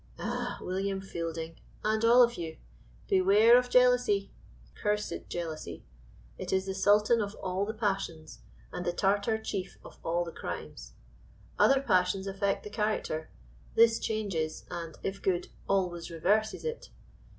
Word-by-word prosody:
Ah! - - -3
William 195 +1 -2
Fielding, 165 -3 -5 0.2
and 215 +1 +1
all 240 +2 +7
of 240 0 +2
you, 165 -6 -6 0.5
"Beware 200 +5 +6
of 250 0 +3
jealousy" 250 -5 +3 0.4
cursed 210 - -2
jealousy! 160 - -5 0.6
it - - -4
is 190 0 +1
the 190 - -3
sultan 210 +4 +4
of 205 0 -4
all 190 +2 -2
the 220 - -2
passions, 195 -7 -3 0.3
and 180 - -4
the 175 0 -1
Tartar 205 +4 +1
chief 195 -4 -5
of - - -13
all 170 +1 0
the 170 - -6
crimes. - - -7 0.7
Other 270 0 +5
passions 185 -5 +2
affect 195 0 -1
the 210 - -8
character; 210 -7 -2 0.5
this 225 0 +5
changes, 195 -8 -2
and, 170 -2 -5
if 195 0 -3
good, 180 -2 0 0.2
always 180 -3 0
reverses 205 - 0
it! 470 +1 -4
195 Hz, 140 wpm, -30 LUFS, 175-215 Hz, 0.7 s, all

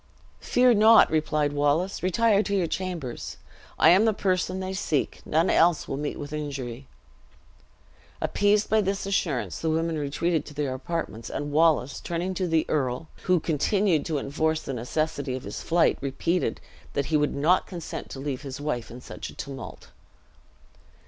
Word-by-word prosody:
"Fear 250 0 +4
not," 220 -2 +6
replied 150 -2 +1
Wallace; 145 +6 +1
"retire 205 +3 +3
to 200 -1 -1
your 185 -3 +2
chambers. 170 -8 -4 0.4
I - - +6
am 195 +5 +5
the 220 -2 +2
person 185 -1 0
they 190 0 -4
seek: 155 -6 -1
none 160 +4 +2
else 170 -1 +3
will - - -3
meet 145 +1 -3
with 145 +1 -7
injury." 135 -4 -5 1.3
Appeased 205 +1 +2
by 220 0 +3
this 195 0 -2
assurance, 140 - -1
the 160 - -1
women 160 0 0
retreated 155 +2 0
to 150 - -11
their 140 -3 -1
apartments; 130 -4 -4
and 145 0 -4
Wallace, 150 -3 +2
turning 175 +2 -3
to 185 0 -1
the 160 -1 +2
earl, 135 +1 -1 0.2
who 180 -1 +3
continued 165 +2 +1
to 160 -3 -1
enforce 155 +3 -1
the 135 - -4
necessity 140 +2 -2
of 130 - -6
his 100 - -6
flight, 170 0 +2
repeated, 140 +6 -1 0.3
that 140 - 0
he - - +5
would 150 -1 +1
not 160 +6 +2
consent 175 -4 -7
to 135 - -7
leave 135 -2 -3
his 135 -2 -7
wife 145 -6 -3
in 125 +2 -10
such - - -8
a - - -13
tumult. 135 -1 -8
155 Hz, 170 wpm, -26 LUFS, 140-185 Hz, 1.3 s, not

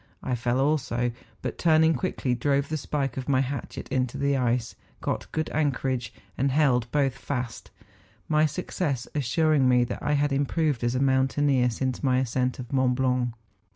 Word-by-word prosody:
I 130 - -1
fell 120 +1 0
also, 135 -4 +1 0.3
but - - -4
turning 160 -1 +4
quickly, 155 -8 -1
drove 140 +3 0
the 155 - -1
spike 135 -3 -2
of 130 +1 -4
my 130 -2 +3
hatchet 135 0 -4
into 130 0 -1
the 140 0 +1
ice, 125 -2 0 0.3
got - - -3
good 155 -1 -1
anchorage, 130 -6 0 0.2
and 135 +1 +1
held 130 -5 +2
both 140 -3 +2
fast 125 -4 -5 0.6
;—my 155 0 +3
success 150 -4 -3
assuring 150 0 +2
me 125 -1 +5
that 120 - -4
I 150 - 0
had 145 -1 +1
improved 145 -1 0
as 120 +1 +1
a - - +1
mountaineer 135 -1 +2
since 130 +2 -2
my 130 -2 +2
ascent 130 0 0
of 125 +1 -8
Mont 130 -2 +2
Blanc. 125 -2 0
135 Hz, 170 wpm, -26 LUFS, 125-145 Hz, 0.6 s, me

